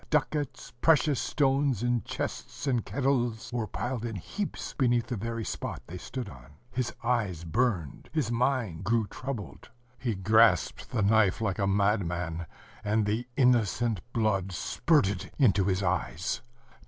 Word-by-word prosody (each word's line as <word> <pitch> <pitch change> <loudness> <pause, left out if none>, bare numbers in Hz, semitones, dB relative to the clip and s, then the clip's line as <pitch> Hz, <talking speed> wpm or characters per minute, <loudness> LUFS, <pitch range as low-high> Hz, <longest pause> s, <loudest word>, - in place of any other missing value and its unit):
Ducats, 150 -2 -1
precious 150 -4 +4
stones 135 -4 +1
in 120 -1 +2
chests - - -5
and 125 -5 +1
kettles, 120 -5 0
were 115 -3 -1
piled 120 +4 -3
in 115 -2 -3
heaps 200 - -4
beneath 120 -3 +2
the 125 - -3
very 115 +1 -3
spot - - -4
they 90 +3 -8
stood 125 +4 -5
on. 65 -1 -13 0.2
His 125 -1 -1
eyes 105 -9 0
burned,... 90 - -1
his 145 -7 0
mind 120 -8 0
grew 110 +2 +2
troubled.... 125 0 -6 0.3
He 120 -5 -1
grasped 110 +4 +3
the 115 -5 0
knife 105 -2 +4
like 110 -3 -1
a 100 - +2
madman, 90 -5 0 0.4
and 105 0 +2
the 110 +4 -1
innocent 120 -5 +3
blood 100 -5 +1
spurted 100 - +1
into 100 -9 +4
his 95 0 +1
eyes. 90 -1 -1
115 Hz, 140 wpm, -29 LUFS, 95-125 Hz, 0.4 s, precious